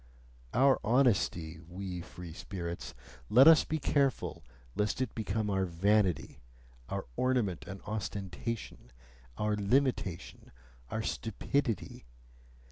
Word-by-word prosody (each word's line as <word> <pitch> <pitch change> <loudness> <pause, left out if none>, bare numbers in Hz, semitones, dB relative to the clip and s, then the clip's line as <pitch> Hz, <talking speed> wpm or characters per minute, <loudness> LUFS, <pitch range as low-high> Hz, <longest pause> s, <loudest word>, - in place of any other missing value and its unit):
Our 135 -1 +5
honesty, 100 -10 +2
we 90 0 -5
free 85 -1 -9
spirits 85 -8 -6 0.3
let 130 +6 +8
us 160 -1 +9
be 160 - -1
careful 140 -2 0 0.3
lest 105 - 0
it 130 -3 -1
become 110 0 -1
our 95 -1 +1
vanity, 90 -1 +1 0.5
our - - -3
ornament 120 - 0
and 100 -1 -8
ostentation, 105 - -5 0.5
our 105 0 +1
limitation, 105 -4 0 0.4
our 110 - -2
stupidity! 115 - -2
105 Hz, 105 wpm, -32 LUFS, 90-125 Hz, 0.5 s, us